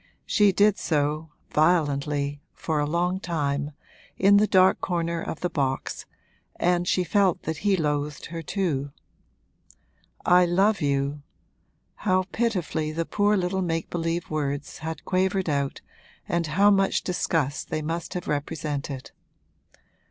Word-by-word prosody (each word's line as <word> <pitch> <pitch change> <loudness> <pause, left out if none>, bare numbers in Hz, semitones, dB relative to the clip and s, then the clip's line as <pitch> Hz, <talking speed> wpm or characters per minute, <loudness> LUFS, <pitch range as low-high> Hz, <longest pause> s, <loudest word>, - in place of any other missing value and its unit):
She 205 -2 +4
did 205 +1 +3
so, 155 0 0 0.2
violently, 145 -3 +1
for 155 -2 -1
a 145 - 0
long 175 +3 0
time, 145 -4 -2 0.4
in 200 +1 +6
the 210 +1 +4
dark 185 -1 +4
corner 170 -2 -1
of 160 - -5
the 180 - 0
box, 135 -4 -2 0.5
and 175 0 +1
she 180 - +2
felt 190 0 +2
that 160 -1 -3
he 200 +3 +2
loathed 150 -2 -2
her 165 - -4
too. 155 -6 -1 1.4
'I 180 0 +6
love 195 +4 +2
you!' 140 0 0 0.8
how 185 -2 +2
pitifully 180 -9 -1
the 165 +2 -2
poor 205 +3 +2
little 190 +1 0
make 165 -2 -2
believe 165 0 -2
words 145 -2 -3
had 160 -1 -6
quavered 190 0 +1
out 140 -2 -1 0.5
and 170 -1 0
how 200 +7 +4
much 195 -1 +2
disgust 160 -5 -1
they 155 - -2
must 165 +4 -4
have 180 - -4
represented! 145 -2 -3
165 Hz, 135 wpm, -25 LUFS, 150-185 Hz, 1.4 s, in